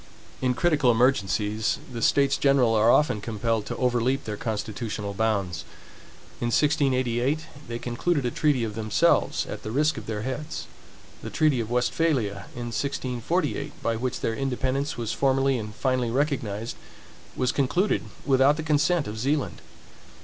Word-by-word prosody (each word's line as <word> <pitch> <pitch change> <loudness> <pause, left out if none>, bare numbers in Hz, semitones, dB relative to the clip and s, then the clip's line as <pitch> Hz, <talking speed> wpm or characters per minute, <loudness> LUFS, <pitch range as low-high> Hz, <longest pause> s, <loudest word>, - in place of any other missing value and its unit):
In 125 -1 +1
critical 150 -4 +3
emergencies, 110 -3 +2 0.2
the 115 - -4
States 140 +3 +3
General 135 -5 +3
are 110 +1 +4
often 120 -5 +3
compelled 115 0 -1
to - - -3
overleap 125 +2 +1
their 105 - -4
constitutional 105 -1 -4
bounds. 100 -6 -1 0.8
In 120 - -1
1688, 135 0 +1 0.2
they 115 - -4
concluded 130 +5 -1
a 120 - 0
treaty 145 -5 +1
of 110 -2 -3
themselves 110 -2 +2
at - - -6
the - - -6
risk 150 +2 +1
of 105 - -12
their 105 -1 -3
heads. 150 +5 -4 0.6
The - - -6
treaty 150 -5 +2
of 115 -1 -3
Westphalia, 120 -5 0
in 120 -1 -5
1648, 140 +4 -2
by 115 - +1
which 125 +2 -3
their 115 - 0
independence 135 +2 -1
was 115 -2 -2
formerly 135 -1 +2
and 105 -1 -7
finally 130 -3 0
recognized, 120 -5 -1 0.6
was 125 0 +1
concluded 175 +9 +1 0.2
without 135 +2 +4
the 160 - -3
consent 155 +1 +2
of 105 +1 -5
Zealand. 140 +4 -1
125 Hz, 150 wpm, -26 LUFS, 110-140 Hz, 0.8 s, are